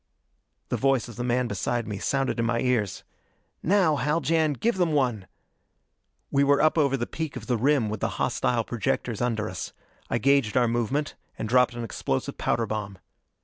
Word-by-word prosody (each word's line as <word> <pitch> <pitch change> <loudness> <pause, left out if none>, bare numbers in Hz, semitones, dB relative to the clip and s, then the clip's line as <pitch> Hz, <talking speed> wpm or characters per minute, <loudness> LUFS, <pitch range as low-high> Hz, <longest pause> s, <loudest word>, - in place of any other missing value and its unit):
The - - 0
voice 135 -3 +2
of 120 - -10
the 120 - -4
man 125 0 +1
beside 115 +3 -2
me 105 -2 -4
sounded 135 +1 0
in 115 - +1
my 120 0 +1
ears: 120 -6 0 0.6
"Now, 180 -5 +3
Haljan, 155 +3 +1
give 225 - 0
them 175 -4 +1
one!" 120 -9 0 1.0
We 140 0 +3
were 140 0 +4
up 155 +1 +4
over 140 -4 +2
the 120 - -2
peak 160 0 -5
of 120 -4 -7
the 125 - +1
rim 130 0 +2
with 105 0 -4
the - - -2
hostile 60 - 0
projectors - - -2
under 110 -3 0
us. 90 -4 -6 0.4
I - - +1
gauged 135 -2 +2
our 120 -1 +4
movement, 120 +6 -1 0.2
and - - -3
dropped 125 +1 +3
an 120 - -4
explosive 65 -11 -3
powder 115 - +1
bomb. 105 -2 -4
125 Hz, 185 wpm, -26 LUFS, 115-140 Hz, 1.0 s, were